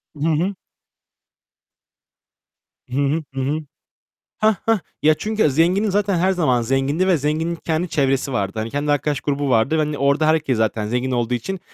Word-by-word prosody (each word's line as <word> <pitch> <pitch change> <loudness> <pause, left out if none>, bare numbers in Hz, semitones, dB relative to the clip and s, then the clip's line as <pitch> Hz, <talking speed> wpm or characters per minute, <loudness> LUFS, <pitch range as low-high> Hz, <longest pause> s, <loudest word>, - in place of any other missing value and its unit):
Hı 150 +2 -2
hı. 170 +6 0 2.3
Hı 125 - -4
hı. 145 +3 +1
Hı 135 - -3
hı. 145 +4 -1 0.8
Heh, 215 0 +3
heh. 225 -2 +3 0.2
Ya, 155 +1 +6
çünkü 215 +1 0
zenginin 175 +9 +2
zaten 200 -1 +1
her 185 +3 +2
zaman 150 -10 +1
zengindi 135 +8 0
ve 185 -3 +4
zenginin 155 +4 -1
kendi 165 +1 -2
çevresi 135 -2 0
vardı. 100 -4 -1
Hani, 110 +1 -3
kendi 145 +3 -1
arkadaş 145 0 0
grubu 145 -1 -1
vardı. 120 +5 +2
Ve, - - +1
hani, 150 -1 -1
orada 140 +3 +2
herkes 155 -5 +2
zaten 110 -1 0
zengin 125 +3 -1
olduğu 120 -1 0
için 135 +11 -3
150 Hz, 170 wpm, -21 LUFS, 135-170 Hz, 2.3 s, Ya